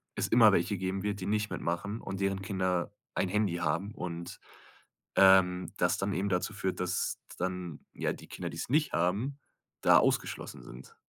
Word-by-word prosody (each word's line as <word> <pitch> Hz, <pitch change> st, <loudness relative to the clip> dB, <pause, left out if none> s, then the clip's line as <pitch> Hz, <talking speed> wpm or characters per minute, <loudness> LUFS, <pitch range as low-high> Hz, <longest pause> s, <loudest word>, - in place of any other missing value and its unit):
es -, -, 0 dB
immer 115 Hz, -2 st, +7 dB
welche 95 Hz, +2 st, +1 dB
geben 95 Hz, +1 st, -2 dB
wird, 105 Hz, 0 st, -2 dB
die -, -, -3 dB
nicht 105 Hz, 0 st, 0 dB
mitmachen 100 Hz, +6 st, -3 dB
und 95 Hz, 0 st, -5 dB
deren 95 Hz, 0 st, 0 dB
Kinder 95 Hz, -2 st, -1 dB, 0.2 s
ein 95 Hz, -, 0 dB
Handy 100 Hz, -2 st, +1 dB
haben 90 Hz, +4 st, -1 dB
und, 85 Hz, -3 st, -6 dB, 0.8 s
ähm, 95 Hz, -1 st, +5 dB
das 90 Hz, +2 st, +2 dB
dann 100 Hz, +1 st, -1 dB
eben 100 Hz, +2 st, -1 dB
dazu 90 Hz, +3 st, 0 dB
führt, 95 Hz, -2 st, -2 dB
dass 90 Hz, +1 st, -1 dB, 0.2 s
dann 90 Hz, -3 st, -4 dB
ja -, -, -1 dB
die -, -, -12 dB
Kinder, 85 Hz, -2 st, -5 dB
die 80 Hz, -, -8 dB
es -, -, -4 dB
nicht 150 Hz, +2 st, +2 dB
haben, 105 Hz, +12 st, 0 dB, 0.4 s
da -, -, +7 dB
ausgeschlossen -, -, -1 dB
sind. 460 Hz, -, -12 dB
95 Hz, 180 wpm, -30 LUFS, 90-100 Hz, 0.8 s, immer